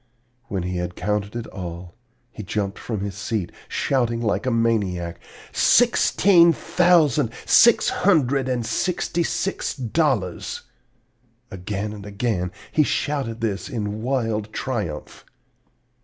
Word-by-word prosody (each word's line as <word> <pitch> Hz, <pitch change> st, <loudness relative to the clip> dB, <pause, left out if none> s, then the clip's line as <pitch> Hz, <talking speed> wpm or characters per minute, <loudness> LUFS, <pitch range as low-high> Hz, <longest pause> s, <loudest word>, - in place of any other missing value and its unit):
When 95 Hz, -3 st, -3 dB
he 90 Hz, 0 st, -3 dB
had 90 Hz, 0 st, -4 dB
counted 105 Hz, +3 st, -2 dB
all, 85 Hz, -1 st, -7 dB, 0.4 s
he 110 Hz, -, -8 dB
jumped 100 Hz, 0 st, -3 dB
from 110 Hz, -5 st, -4 dB
his 100 Hz, -1 st, -3 dB
seat, 105 Hz, -2 st, -3 dB, 0.2 s
shouting 120 Hz, -4 st, 0 dB
like 115 Hz, +2 st, -1 dB
a -, -, +4 dB
maniac, 105 Hz, -8 st, 0 dB, 0.3 s
'Sixteen 195 Hz, -7 st, +5 dB
thousand, 170 Hz, -12 st, +3 dB, 0.2 s
six 235 Hz, -, +6 dB
hundred 140 Hz, -, +2 dB
and 120 Hz, -2 st, -1 dB
sixty 170 Hz, +8 st, -1 dB
six 195 Hz, +3 st, -2 dB
dollars!' 125 Hz, -, -1 dB, 0.9 s
Again 100 Hz, +3 st, -4 dB
and 105 Hz, -1 st, -9 dB
again 100 Hz, -3 st, -2 dB, 0.2 s
he 155 Hz, -, +3 dB
shouted 135 Hz, -6 st, -1 dB
this 105 Hz, +3 st, -2 dB
in 105 Hz, -4 st, -3 dB
wild 115 Hz, -4 st, -1 dB
triumph. 105 Hz, -, -4 dB
115 Hz, 115 wpm, -23 LUFS, 100-135 Hz, 0.9 s, six